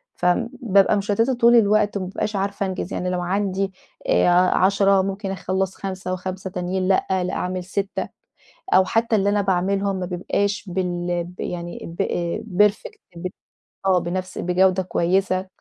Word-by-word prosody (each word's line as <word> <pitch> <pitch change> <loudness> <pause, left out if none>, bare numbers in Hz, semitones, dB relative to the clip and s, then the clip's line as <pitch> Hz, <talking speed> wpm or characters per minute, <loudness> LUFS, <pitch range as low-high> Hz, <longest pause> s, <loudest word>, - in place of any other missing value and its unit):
فبابقى 200 +2 +2
مشتَّتة 205 +5 +1
طول 235 -1 +5
الوقت، 210 -2 +3
وما 190 - -3
بابقاش 205 +3 -3
عارفة 200 0 -1
أنجِز 190 0 -4
يعني 180 - -2
لو 180 -1 -1
عندي 195 +1 -1 0.3
آآ، - - +4 0.3
10 195 +1 +4
ممكن 195 +1 -3
أخلّص 190 0 -2
5 190 -1 -4
و5 185 +1 -5
تانيين 185 +1 -2
لأ، 190 - +2 0.2
لأ 180 - -3
أعمِل 180 0 -2
6، 195 +2 -3 0.7
أو 190 - +6
حتى 225 +4 +1
اللي 200 -1 +1
أنا 205 0 +2
باعملهم 195 +1 0
ما 185 -1 -3
بيبقاش 200 +4 -1
بال 175 -1 -2
ب 180 +1 -11
يعني 175 -1 -5 0.2
ب - - +5 0.7
perfect 420 - -10 0.2
ب 170 +2 -5 0.6
آه، 185 -2 +4
بنفس 180 +2 -4
بجودة 185 +1 +2
كويسة، 185 +1 0
190 Hz, 150 wpm, -22 LUFS, 180-200 Hz, 0.7 s, أو